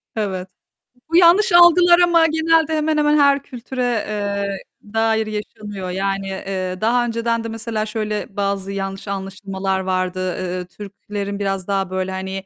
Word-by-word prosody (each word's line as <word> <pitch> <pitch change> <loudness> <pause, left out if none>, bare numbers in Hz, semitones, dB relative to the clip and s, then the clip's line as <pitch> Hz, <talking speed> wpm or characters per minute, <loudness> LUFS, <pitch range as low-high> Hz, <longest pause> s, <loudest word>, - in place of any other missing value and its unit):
Evet, 190 -4 -3 0.6
bu 335 - -1
yanlış 360 +3 +6
algılar 345 0 +7
ama 340 -2 +5
genelde 320 0 +2
hemen 305 0 0
hemen 300 0 +3
her 280 -1 +4
kültüre, 255 0 -5 0.2
eee, 200 -1 -2 0.4
dair 225 -1 +1
yaşanıyor. 210 -3 -6
Yani, 195 +1 -2
eee, 190 -1 -4
daha 240 +2 +2
önceden 230 0 -1
de - - -4
mesela 225 -1 -3
şöyle 210 -2 -4
bazı 200 -1 -1
yanlış 195 0 -5
anlaşmalar 195 0 -3
vardı: 185 -1 -2
Eee, 180 -1 -4
Türklerin 200 +1 -7
biraz 195 -2 -2
daha 195 -2 -1
böyle 185 0 -2
hani, 190 0 -5
205 Hz, 145 wpm, -20 LUFS, 195-245 Hz, 0.6 s, algılar